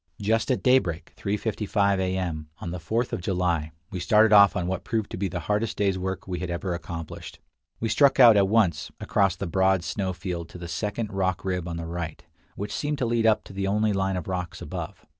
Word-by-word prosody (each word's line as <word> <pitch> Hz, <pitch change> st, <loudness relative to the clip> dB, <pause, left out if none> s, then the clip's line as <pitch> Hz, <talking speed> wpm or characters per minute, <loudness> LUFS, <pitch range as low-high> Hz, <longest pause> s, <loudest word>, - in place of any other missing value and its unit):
Just 110 Hz, +4 st, +1 dB
at 125 Hz, -7 st, 0 dB
daybreak, 95 Hz, -11 st, +2 dB
3:55 100 Hz, -1 st, 0 dB
A. 95 Hz, 0 st, 0 dB
M., 80 Hz, -4 st, -3 dB
on 85 Hz, -, -6 dB
the 90 Hz, -, -4 dB
4th 115 Hz, +8 st, -1 dB
of -, -, -2 dB
July, 85 Hz, -4 st, 0 dB, 0.2 s
we 90 Hz, -, -4 dB
started 110 Hz, +3 st, +4 dB
off 100 Hz, -1 st, +7 dB
on 90 Hz, -3 st, -1 dB
what 95 Hz, 0 st, -2 dB
proved 110 Hz, -3 st, -2 dB
to -, -, -4 dB
be 100 Hz, +1 st, -1 dB
the 90 Hz, 0 st, -4 dB
hardest 105 Hz, +6 st, -1 dB
day's 100 Hz, -2 st, +2 dB
work 95 Hz, 0 st, -4 dB
we 90 Hz, -2 st, -3 dB
had 90 Hz, 0 st, -4 dB
ever 85 Hz, +1 st, -2 dB
accomplished. 85 Hz, -2 st, -7 dB, 0.4 s
We 115 Hz, -, -1 dB
struck 135 Hz, +4 st, +4 dB
out 120 Hz, -4 st, +9 dB
at 100 Hz, -1 st, +4 dB
once 100 Hz, -7 st, +2 dB
across 100 Hz, -3 st, +1 dB
the 100 Hz, -, -4 dB
broad 95 Hz, +1 st, +2 dB
snow 95 Hz, +2 st, -2 dB
field 90 Hz, -2 st, -5 dB
to -, -, -10 dB
the 85 Hz, -1 st, -7 dB
second 105 Hz, +3 st, -3 dB
rock 95 Hz, -2 st, -1 dB
rib 90 Hz, -2 st, -2 dB
on 85 Hz, -1 st, -4 dB
the 85 Hz, -, -5 dB
right, 85 Hz, -1 st, -5 dB, 0.3 s
which 100 Hz, +1 st, -5 dB
seemed 150 Hz, 0 st, -2 dB
to 130 Hz, -, 0 dB
lead 115 Hz, -1 st, +2 dB
up 110 Hz, -1 st, +3 dB
to -, -, -12 dB
the 95 Hz, 0 st, -2 dB
only 105 Hz, +1 st, +2 dB
line 95 Hz, -1 st, 0 dB
of 90 Hz, -, -5 dB
rocks 90 Hz, -2 st, -4 dB
above. 90 Hz, +4 st, -7 dB
95 Hz, 225 wpm, -26 LUFS, 90-105 Hz, 0.4 s, out